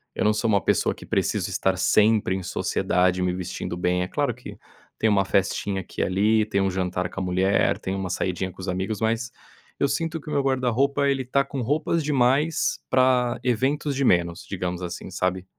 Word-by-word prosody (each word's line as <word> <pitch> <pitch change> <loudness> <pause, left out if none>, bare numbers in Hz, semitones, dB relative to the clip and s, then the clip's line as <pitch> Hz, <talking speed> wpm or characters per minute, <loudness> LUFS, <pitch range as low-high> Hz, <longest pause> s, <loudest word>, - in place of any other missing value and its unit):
Eu - - 0
não 105 - +4
sou 110 +2 0
uma 100 -2 +3
pessoa - - +2
que - - -12
preciso - - 0
estar 95 -1 0
sempre 105 -1 +3
em 95 - -4
sociedade 90 +1 0
me 90 0 +1
vestindo 90 -1 -5
bem, 90 0 +1
é - - -3
claro - - -1
que - - -11 0.4
tem 110 - +2
uma 100 -2 +3
festinha 95 0 0
aqui - - -6
e - - +3
ali, 105 +3 +2
tem 100 -2 0
um 95 - +2
jantar 90 -1 -2
com - - -6
a - - -1
mulher, 95 +2 +2
tem 95 +1 -3
uma 95 -1 -3
saidinha 95 0 -2
com 90 - -21
os 95 - -6
amigos 95 +3 -2
mas, 115 +2 0 0.5
eu 140 - +3
sinto 165 +2 -2
que 150 - -18
o - - -5
meu 140 - +2
guarda-roupa 135 +2 +1
ele 135 -1 +1
tá 140 +2 +2
com 135 -3 -4
roupas 155 +6 0
demais 145 +2 +1
para 130 -2 +3
eventos 135 +4 0
de 140 - 0
menos, 85 -2 +1
digamos 90 -2 -4
assim, 90 +1 -6
sabe. 95 0 -1
105 Hz, 210 wpm, -24 LUFS, 90-130 Hz, 0.5 s, não